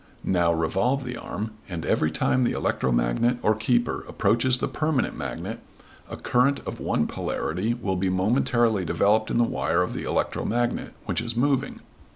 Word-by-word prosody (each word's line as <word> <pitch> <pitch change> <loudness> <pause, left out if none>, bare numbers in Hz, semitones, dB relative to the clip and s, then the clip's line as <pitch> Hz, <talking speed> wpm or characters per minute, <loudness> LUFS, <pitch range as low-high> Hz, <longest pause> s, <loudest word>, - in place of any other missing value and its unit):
Now 85 -2 +2
revolve 95 - 0
the 125 0 -4
arm, 110 -1 -5 0.2
and 85 -3 -4
every 75 - +2
time 130 +11 +1
the 120 - +1
electromagnet - - +1
or 110 - +4
keeper 120 +2 0
approaches 125 +3 +2
the - - -1
permanent 155 -4 0
magnet 70 -5 -5 0.5
a - - -6
current 130 +3 +2
of - - -5
one - - 0
polarity 95 +9 -2
will 100 -6 -2
be 95 +1 0
momentarily 110 +2 +2
developed 105 +5 +2
in - - 0
the 120 - +5
wire 90 -6 +1
of 90 - -4
the - - -4
electromagnet, 120 +1 -1
which - - -1
is 120 0 -4
moving. 135 +2 0
110 Hz, 165 wpm, -25 LUFS, 90-125 Hz, 0.5 s, the